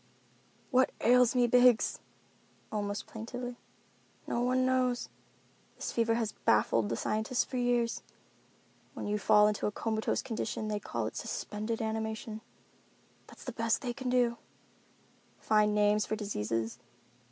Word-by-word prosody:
"What 260 Hz, 0 st, +4 dB
ails 250 Hz, 0 st, +5 dB
me, 245 Hz, -1 st, +4 dB
Biggs?" 245 Hz, -1 st, +4 dB, 0.7 s
almost 205 Hz, -1 st, -3 dB
plaintively. 245 Hz, +2 st, -6 dB, 0.7 s
"No 235 Hz, -, -1 dB
one 255 Hz, +1 st, +2 dB
knows. 255 Hz, -1 st, +1 dB, 0.7 s
This -, -, -4 dB
fever 230 Hz, -1 st, +1 dB
has 225 Hz, -2 st, -1 dB
baffled 110 Hz, 0 st, +3 dB
the 115 Hz, -, -1 dB
scientists 220 Hz, -, 0 dB
for 255 Hz, -, -5 dB
years. 245 Hz, -1 st, +1 dB, 0.9 s
When -, -, -5 dB
you 210 Hz, 0 st, -1 dB
fall 210 Hz, 0 st, +5 dB
into 210 Hz, -1 st, 0 dB
a -, -, -1 dB
comatose 220 Hz, +1 st, -1 dB
condition 225 Hz, -3 st, -3 dB
they 210 Hz, -1 st, -1 dB
call 115 Hz, -, -3 dB
it 110 Hz, -, -5 dB
suspended 215 Hz, +2 st, -3 dB
animation. 220 Hz, 0 st, -3 dB, 0.9 s
That's -, -, -14 dB
the 255 Hz, -, -5 dB
best 230 Hz, 0 st, +1 dB
thing 245 Hz, -2 st, -2 dB
they 260 Hz, -2 st, -3 dB
do—find 235 Hz, -3 st, -2 dB
names 210 Hz, 0 st, +3 dB
for 215 Hz, -, -1 dB
diseases. 115 Hz, -, -3 dB
225 Hz, 130 wpm, -31 LUFS, 210-245 Hz, 0.9 s, ails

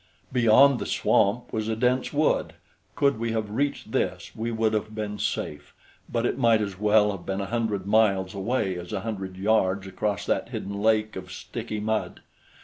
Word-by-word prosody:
Beyond 125 Hz, +2 st, +6 dB
the -, -, -4 dB
swamp 120 Hz, +5 st, +1 dB
was 110 Hz, -1 st, -1 dB
a 110 Hz, -, 0 dB
dense 125 Hz, +3 st, +1 dB
wood. 150 Hz, +1 st, +1 dB, 0.4 s
Could 140 Hz, -4 st, +2 dB
we 115 Hz, 0 st, -1 dB
have 110 Hz, -2 st, -2 dB
reached 140 Hz, +6 st, -2 dB
this, -, -, -2 dB
we 115 Hz, +2 st, -3 dB
would 110 Hz, -1 st, 0 dB
have 110 Hz, 0 st, -2 dB
been 105 Hz, -1 st, -4 dB
safe; 75 Hz, -4 st, -3 dB, 0.4 s
but 115 Hz, 0 st, 0 dB
it 125 Hz, -, -1 dB
might 115 Hz, -3 st, +4 dB
as 100 Hz, -3 st, -4 dB
well 105 Hz, 0 st, +4 dB
have 95 Hz, -3 st, -7 dB
been 95 Hz, 0 st, -3 dB
a 100 Hz, -, -2 dB
hundred 110 Hz, -3 st, -2 dB
miles 100 Hz, -3 st, +2 dB
away 100 Hz, -2 st, -1 dB
as 90 Hz, 0 st, -9 dB
a 100 Hz, -, -2 dB
hundred 95 Hz, -4 st, -5 dB
yards 95 Hz, -1 st, +1 dB
across 95 Hz, +1 st, -2 dB
that -, -, -1 dB
hidden 100 Hz, +1 st, -5 dB
lake 110 Hz, 0 st, +2 dB
of 95 Hz, 0 st, -7 dB
sticky 105 Hz, -, -5 dB
mud. 110 Hz, +1 st, -2 dB
110 Hz, 185 wpm, -26 LUFS, 100-115 Hz, 0.4 s, Beyond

